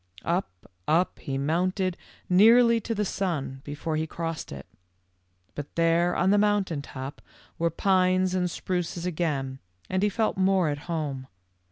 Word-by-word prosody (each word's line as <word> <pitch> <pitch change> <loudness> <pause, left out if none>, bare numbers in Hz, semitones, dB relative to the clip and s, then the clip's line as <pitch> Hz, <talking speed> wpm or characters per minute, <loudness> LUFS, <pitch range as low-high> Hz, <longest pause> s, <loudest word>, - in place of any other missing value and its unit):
" - - -28
Up, 175 +3 0 0.4
up, 170 +4 +2
he 135 -1 -3
mounted 180 +6 0 0.3
nearly 230 +5 +6
to 230 +2 -3
the 210 0 0
sun, 155 -9 -2
be 145 0 -6
fore 155 +1 -3
he 160 +1 -1
crossed 165 0 -5
it. 70 -1 -8 0.9
But 145 -1 -7
there 170 +1 +3
on 185 +2 +3
the 205 - +4
moun 205 -1 +3
tain 165 -6 -4
top 135 0 -8 0.4
were 170 0 +2
pines 185 +1 +2
and 180 -1 +1
spruces 175 -1 -3
again, 150 -7 -2 0.3
and 185 0 +1
he 210 - +3
felt 220 +1 0
more 190 -3 +3
at 145 0 -2
home. 145 -6 -3
175 Hz, 165 wpm, -27 LUFS, 155-190 Hz, 0.9 s, nearly